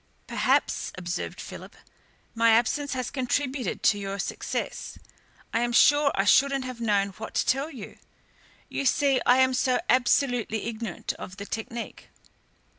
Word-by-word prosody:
"Perhaps," - - 0
observed 180 0 -4
Philip, - - -9 0.6
"my 230 0 +3
absence 280 +6 +1
has 255 -1 -3
contributed 260 0 -2
to 205 - +4
your 195 0 -4
success. - - -4 0.6
I 230 - +2
am 240 0 0
sure 290 +3 +5
I 195 - +2
shouldn't 275 +5 +4
have 250 -2 -7
known 205 -3 +1
what 215 +3 -9
to - - +1
tell 275 +4 +1
you. 250 -10 -10 0.7
You 275 - -2
see, 275 -3 +2
I 245 - +6
am 260 0 +4
so 255 0 +1
absolutely 245 -3 +2
ignorant 225 -5 -4
of 190 - -8
the 200 - -6
technique." 225 +2 -6
240 Hz, 145 wpm, -26 LUFS, 220-265 Hz, 0.7 s, I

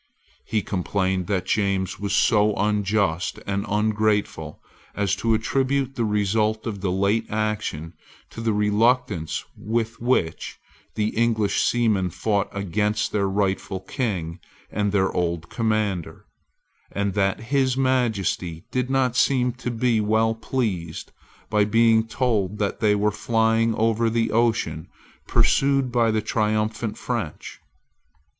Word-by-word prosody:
He 110 -3 -1
complained 95 -1 -1
that 95 -3 -1
James 100 -2 0
was 100 -1 -1
so 105 -2 +3
unjust 100 -4 0
and 100 0 -2
ungrateful 105 -6 0 0.4
as 100 -1 +1
to 115 +1 +2
attribute 135 +4 0
the 120 -4 -1
result 105 +1 0
of 100 -4 -4
the 95 -2 0
late 100 +4 +1
action 105 -7 -2 0.4
to 115 - -7
the 115 -1 +1
reluctance 105 -3 +1
with 115 +1 -3
which 120 -10 0 0.4
the 105 0 0
English 110 -3 +1
seamen 110 -6 +1
fought 100 +3 0
against 105 +2 -1
their 100 -2 0
rightful 95 0 -1
King 95 -5 -3 0.3
and 105 0 0
their 95 -2 +2
old 85 -1 -2
commander, 110 -6 -1 0.7
and 100 -1 -1
that 100 -1 +1
his 130 +2 0
Majesty 110 -10 0
did 125 0 -1
not 130 -3 +1
seem 125 -1 +3
to 125 - -5
be 120 -1 +1
well 110 +1 +2
pleased 110 -8 -3 0.4
by 105 -1 +2
being 115 +1 +3
told 105 -5 0
that 100 -1 -2
they 105 -2 +3
were 105 +1 +1
flying 115 +1 +1
over 115 +1 +2
the 115 -1 0
ocean 110 -9 0 0.4
pursued 135 -2 +2
by 120 -2 +3
the 110 -1 0
triumphant 110 0 -1
French. 115 -11 -5
105 Hz, 130 wpm, -23 LUFS, 100-115 Hz, 0.7 s, so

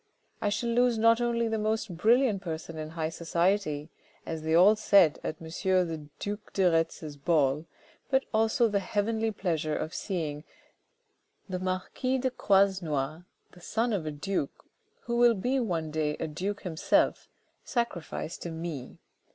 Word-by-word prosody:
I 210 - +1
shall 210 +3 -1
lose 245 0 +3
not 230 +1 +4
only 235 -1 +1
the 220 -1 -1
most 215 -3 -1
brilliant 225 +2 +3
person 165 -2 -5
in 155 0 -5
high 160 -1 -2
society, 170 -2 0 0.3
as 160 -1 -4
they 160 +1 +1
all 190 +5 +7
said 195 -7 +4
at 155 - -4
M. 165 - -10
the 170 -3 0
duke 205 +1 -5
de 195 - +1
Retz's 165 -2 -1
ball, 150 0 +1 0.4
but 265 0 +2
also 225 +3 +3
the 205 -2 +1
heavenly 220 +3 0
pleasure 165 -7 -1
of 155 - -4
seeing 155 -6 -3 1.0
the 185 -2 -3
marquis 185 +8 -1
de 260 0 0
Croisenois, 175 - +1 0.3
the 180 - -17
son 225 +5 0
of 175 -6 -2
a - - -1
duke, 150 0 -3 0.4
who 235 0 -2
will 240 -1 +6
be 250 +7 0
one 170 -9 -2
day 150 -1 -1
a - - -1
duke 190 +7 -4
himself, 165 -4 +1 0.3
sacrificed 210 -9 -3
to 175 - -4
me. 160 -5 -6
185 Hz, 155 wpm, -29 LUFS, 160-220 Hz, 1.0 s, all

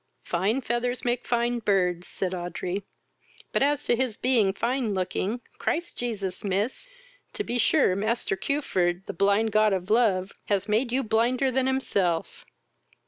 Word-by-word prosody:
"Fine 200 +9 0
feathers 245 +1 -2
make 245 0 -1
fine 240 0 +1
birds, 180 -5 +1
(said 190 -1 -3
Audrey,) 180 +2 -3 0.7
but - - +1
as 290 +1 +2
to - - +3
his 245 -3 -1
being 235 -6 +3
fine 230 +1 -1
looking, 190 +5 -2 0.2
Christ 345 +2 -2
Jesus, 200 -6 -4
miss, 205 - -1 0.5
to 415 - -3
be 245 -10 -2
sure 270 -9 +4
master 215 0 0
Cuford, 190 -9 -1
the - - -5
blind 200 +4 +2
god 215 -1 +4
of 190 +1 -2
love, 200 -5 +3 0.2
has 200 -1 +1
made 225 +4 +1
you 265 +2 +1
blinder 245 +4 +2
than 260 +1 +1
himself." 195 -11 -1
220 Hz, 150 wpm, -26 LUFS, 190-245 Hz, 0.7 s, sure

